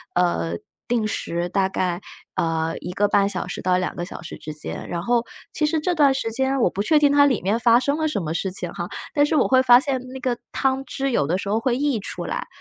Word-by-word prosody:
呃， 85 - +1 0.3
定 235 -3 +1
时 170 -4 -2
大 190 +1 +1
概， 180 -1 -1 0.3
呃， 165 0 0
1.5 200 +2 +1
小 - - -3
时 - - -5
到 180 0 +2
2 185 - -2
个 175 - -4
小 - - -9
时 - - -8
之 155 - -7
间。 150 - -7
然 170 0 -3
后 240 +2 +1 0.3
其 305 - +1
实 315 +1 +1
这 355 +4 0
段 285 -3 +5
时 225 -4 -2
间 265 +3 0
我 - - +4
不 200 - -3
确 310 +8 +3
定 290 -1 +4
它 285 0 +6
里 260 -7 +1
面 205 +5 0
发 235 0 +5
生 285 +3 0
了 315 0 0
什 240 -11 -1
么 155 +1 -3
事 190 +2 -2
情 180 -2 -4
哈， 175 -2 -4 0.3
但 290 - +4
是 300 - 0
我 - - +3
会 260 0 +5
发 245 -1 +7
现 270 -2 -1
那 265 - -6
个 250 -2 -1
汤 270 0 0
汁 275 -1 -2
有 145 -11 +1
的 180 +3 +1
时 200 - -5
候 215 +3 +1
会 250 0 0
溢 280 -5 +1
出 200 - -5
来， - - -4
225 Hz, 260 characters per minute, -23 LUFS, 180-270 Hz, 0.3 s, 发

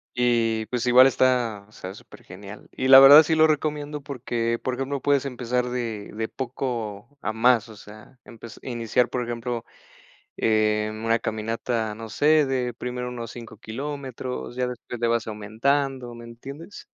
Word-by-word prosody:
Y 115 -3 +1
pues 125 +2 -2
igual 125 +1 +7
está, 125 -6 +1
o - - -24
sea, 95 -3 -8
supergenial - - -13
y 130 - -2
la 135 0 +11
verdad, 140 +3 +10
sí 160 - 0
lo 160 0 +5
recomiendo 150 -1 -2
porque, 120 -4 -3
por 130 - -1
ejemplo, 135 +1 -3
puedes 140 -1 +2
empezar 125 -1 -2
de 115 -4 -4
de 110 +1 -3
poco 120 -2 -5
a 110 - -2
más, 115 0 +3
o 110 - -12
sea, 110 +5 -15
empez 115 -1 -12
iniciar, 120 0 0
por 125 - -2
ejemplo, 120 0 -4 0.7
eh, 110 -1 +1
una 115 +1 0
caminata, 110 0 -3
no 110 0 -9
sé, 150 +7 +4
de 125 -3 -2
primero 125 0 -5
unos 120 -2 -6
5 115 -2 -10
kilómetros, 130 +1 -6
ya 125 0 -1
después 125 -1 -8
le 120 - +1
vas 115 -1 0
aumentando, 120 +4 -1
¿me 120 0 -11
entiendes? 135 - -10
120 Hz, 165 wpm, -24 LUFS, 115-130 Hz, 0.7 s, la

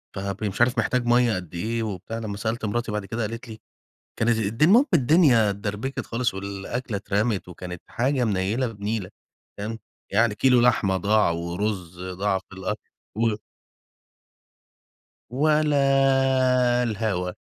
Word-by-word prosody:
فبي 100 +2 -3
مش 95 - -4
عارف 120 +1 +3
محتاج 120 +3 +1
مَيّة 120 -2 +3
قد 90 -2 -7
إيه 115 +7 -2
وبتاع، 105 +1 -5
لما 105 -3 -5
سألت 110 +2 -2
مراتي 115 +2 -2
بعد 105 -1 -3
كده 110 +5 -4
قالت 115 +3 -4
لي 110 - -9 0.6
كانت 115 0 +2
الدن 110 +8 +2
المهم 240 +9 +6
الدنيا 135 - +5
اتدربكت 105 +6 -4
خالص، 115 -1 -1
والأكلة 100 +4 -4
اترمت 100 +1 -1
وكانت 90 0 -8
حاجة 130 +2 0
منيلة 105 +5 0
بنيلة، 105 -2 -4 0.5
تمام، 110 +2 -5 0.3
يعني 105 +1 +3
كيلو 125 -1 +4
لحمة 110 -6 +3
ضاع 105 +2 +3
ورز 90 +1 -3
ضاع 95 +2 -1
في 95 0 -16
الأكل 95 +3 -3 0.5
و - - -5 1.9
ولا 135 -3 +3
الهوا. 105 -5 -1
110 Hz, 135 wpm, -24 LUFS, 100-125 Hz, 1.9 s, المهم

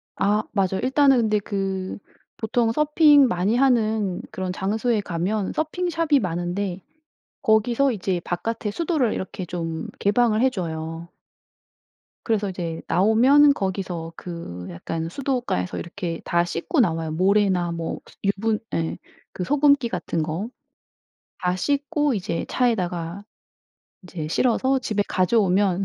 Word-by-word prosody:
아 210 +2 +1
맞아요. 190 -2 0
일단은 270 0 +4
근데 215 -3 +2
그 195 -2 -3 0.4
보통 225 +1 +1
서핑 295 0 +5
많이 195 +1 +1
하는 220 -7 +2
그런 185 -1 -3
장소에 215 +4 0
가면 190 +3 -2
서핑샵이 325 -1 +1
많은데 180 +1 -2 0.6
거기서 240 +4 +3
이제 190 -5 -1
바깥에 210 +4 -3
수도를 300 -4 0
이렇게 190 -1 -5
좀 165 -2 -4
개방을 220 +1 +2
해 265 - +5
줘요. 165 -5 -5 1.2
그래서 210 -3 0
이제 170 -3 -4
나오면 255 +9 +5
거기서 185 -6 -3
그 165 - -7
약간 160 - -4
수돗가에서 250 - -2
이렇게 170 -1 -5
다 170 0 +2
씻고 175 - -2
나와요. 165 -8 +1
모래나 185 0 +2
뭐 165 -1 -4 0.2
유분 210 +2 0
예. 165 -1 -1 0.4
그 180 - -4
소금기 285 +1 +3
같은 170 -4 -2
거 165 +8 -3 0.9
다 180 0 +1
씻고 290 - 0
이제 180 -4 -2
차에다가 180 -6 -1 0.8
이제 175 -4 -6
실어서 260 +9 +1
집에 210 -4 -1
가져오면 195 -1 +2
200 Hz, 265 characters per minute, -23 LUFS, 175-245 Hz, 1.2 s, 서핑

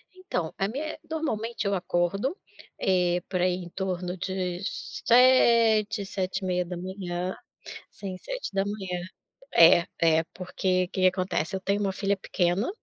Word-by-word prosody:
Então, 180 - -3
a 195 - +1
minha 270 +9 -4
é - - -12
Normalmente, 235 -8 -2
eu 200 - +1
acordo, 195 - -1 0.4
eh, 180 -1 +2
por 185 -2 -1
aí, 180 0 +3
em 180 -1 -7
torno 180 -1 -3
de 185 -1 -3
7h, 230 -4 +3
7h30. 185 -1 -3 0.5
Sim, 190 -2 -7
7h. 195 - -3 0.5
Eh, 170 0 +7
eh, 160 -1 +4
porque, 185 0 -1
que 190 - -3
que 185 - +7
acontece? 185 -1 -1
Eu 190 - -4
tenho 200 +2 0
uma 195 -2 0
filha 200 +1 0
pequena, 180 +2 0
190 Hz, 130 wpm, -27 LUFS, 180-205 Hz, 0.5 s, Eh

